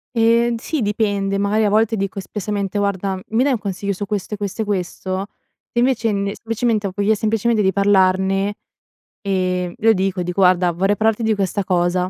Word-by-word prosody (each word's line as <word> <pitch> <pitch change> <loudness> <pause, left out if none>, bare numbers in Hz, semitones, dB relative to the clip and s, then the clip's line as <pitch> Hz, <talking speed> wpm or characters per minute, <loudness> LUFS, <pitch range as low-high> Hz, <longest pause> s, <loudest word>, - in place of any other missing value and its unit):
Ehm, 230 +1 +3
sì, 290 +4 -3
dipende, 205 -2 0
magari 205 +2 +1
a 210 - +3
volte 220 +1 +2
dico 195 0 -3
espressamente: 205 0 -3
"Guarda, 195 -1 -1
mi 225 +3 +2
dai 280 0 +2
un 245 - +1
consiglio 200 0 -3
su 205 +2 -4
questo 205 +1 -4
e - - -3
questo 205 +2 -4
e - - -7
questo?" 190 0 -3 0.4
Se 240 - -1
invece, 240 -3 +2
n 200 -1 -1
semplicemente 225 -2 -1
ho - - -5
voglia 205 +2 +2
semplicemente 220 +1 +1
di 190 - +3
parlarne, 195 0 +2 0.6
ehm, 185 -3 -1
lo 225 +1 +4
dico, 190 -2 0
dico: 180 +2 -4
"Guarda, 180 -1 +4
vorrei 195 +4 +1
parlarti 220 +2 +1
di 220 -1 +2
questa 200 0 -1
cosa." 180 0 +1
200 Hz, 190 wpm, -20 LUFS, 190-220 Hz, 0.6 s, lo